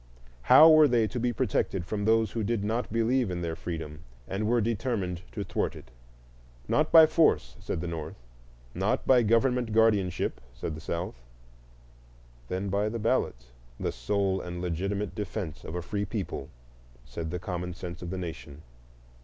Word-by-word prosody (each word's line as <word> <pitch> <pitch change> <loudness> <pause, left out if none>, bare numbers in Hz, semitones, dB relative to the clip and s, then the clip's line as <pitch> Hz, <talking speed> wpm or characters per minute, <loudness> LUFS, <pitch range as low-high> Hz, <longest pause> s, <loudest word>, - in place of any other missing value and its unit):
How 155 - +8
were 155 -1 +8
they 120 -3 +3
to 120 +3 -4
be 120 +1 +1
protected 95 -4 -1
from 105 +1 -3
those 110 -1 +3
who 115 - -2
did 110 0 -1
not 115 +3 -2
believe 115 +1 +1
in 90 -1 -3
their 80 -1 -2
freedom 80 -3 -6 0.3
and 105 +2 -2
were 120 +1 +3
determined 105 -5 -1
to - - -3
thwart - - -2
it? 65 - -13 0.8
Not 155 +1 +1
by 160 -1 +10
force, 155 - +2
said - - -4
the 90 - -4
North; 80 -2 -5 0.6
not 105 +9 0
by 130 -2 +5
government 115 +1 +2
guardianship, 105 -5 +2
said 80 - -4
the 80 - -8
South; 85 -7 -4 1.3
then 95 +6 -3
by 100 +2 0
the 115 - -4
ballot, 110 - 0 0.3
the - - -1
sole 95 +10 -1
and 90 0 -6
legitimate 95 +3 -2
defence 100 -5 -5
of 80 - -6
a 90 - -3
free 100 +3 -2
people, 100 -1 -5 0.6
said 80 -1 -5
the 90 - -3
Common 90 -2 -4
Sense 85 -2 -7
of 90 - -6
the 95 - -4
Nation. 80 -4 -7
100 Hz, 170 wpm, -28 LUFS, 85-115 Hz, 1.3 s, by